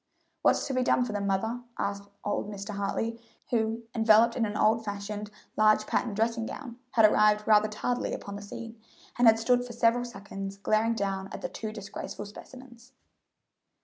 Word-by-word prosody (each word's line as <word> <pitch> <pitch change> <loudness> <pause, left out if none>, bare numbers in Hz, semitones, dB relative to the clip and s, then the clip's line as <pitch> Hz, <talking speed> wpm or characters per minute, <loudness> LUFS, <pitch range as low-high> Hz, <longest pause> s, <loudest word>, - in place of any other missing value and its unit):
"What's - - +3
to 275 - -3
be 255 - +1
done 250 - +3
with 245 - -4
them, 205 -1 -2
mother?" 220 +5 -1 0.2
asked 200 0 -3
old 205 0 -2
Mr. 200 0 -6
Hartley, 225 +3 -2 0.3
who, 225 -1 0
enveloped 225 0 +5
in 230 -3 +1
an 210 0 -4
old 225 +1 +3
fashioned, 205 0 -5 0.3
large 215 0 +4
patterned 220 -2 -1
dressing 225 +1 0
gown, 245 -5 -8
had 225 -4 +6
arrived 210 0 +4
rather 215 -1 +6
tardily 245 +3 -2
upon 200 - -5
the 205 - -7
scene, 225 +2 -9 0.4
and 245 - +6
had 225 0 +7
stood 245 +2 +2
for 245 -1 -8
several 235 +1 +3
seconds 195 -3 -7
glaring 215 +3 +1
down 195 -2 -2
at - - -7
the - - -3
two 220 -1 -5
disgraceful 205 0 -7
specimens. 245 +3 -13
220 Hz, 180 wpm, -29 LUFS, 205-235 Hz, 0.4 s, had